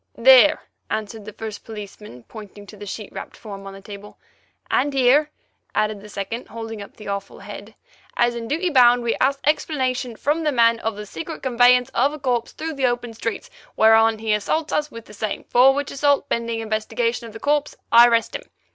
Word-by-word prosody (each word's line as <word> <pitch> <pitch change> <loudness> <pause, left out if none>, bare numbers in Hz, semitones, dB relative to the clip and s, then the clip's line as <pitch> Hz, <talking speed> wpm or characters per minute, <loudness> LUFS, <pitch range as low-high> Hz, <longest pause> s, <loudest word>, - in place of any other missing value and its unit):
"There!" - - +6 0.3
answered 220 0 -4
the 215 - -9
first 215 -1 -7
policeman, 210 - -10
pointing 205 - -12
to 210 - -13
the 205 0 -10
sheet 210 +1 -7
wrapped - - -8
form 195 -3 -9
on 195 - -8
the 195 - -11
table. 205 +1 -11 0.5
"And 285 +1 +1
here!" 270 +4 +4 0.5
added 215 -1 0
the 210 - -12
second, 205 +4 -5
holding 225 -2 -7
up 200 - -12
the 210 - -11
awful 200 0 -5
head. 205 +1 -10 0.4
"As 240 0 +3
in 235 -1 -6
duty 335 +6 -1
bound, 245 -3 +5
we 235 - +1
ask 275 +1 +2
explanation 260 -5 0
from 295 +7 0
that 300 -4 0
man 230 -1 +4
of 225 -2 -3
the 210 0 -7
secret 320 +10 -7
conveyance 250 -1 +4
of 275 +5 +1
a 305 - -8
corpse 245 -4 -1
through 320 0 -5
the 270 -3 +1
open 240 -1 -3
streets, 230 0 -5 0.2
whereon 225 0 +5
he 220 0 -1
assaults 305 +10 -1
us 300 0 0
with 230 -4 -11
the - - -14
same, 210 0 -4
for 255 +2 +5
which 285 0 -3
assault, 285 0 +1
pending 230 -1 -2
investigation 230 +2 -2
of 220 - -12
the 225 - -9
corpse, 295 +2 0 0.2
I 235 +1 +8
arrest 230 -1 +1
him. - - -4
230 Hz, 200 wpm, -22 LUFS, 215-265 Hz, 0.5 s, I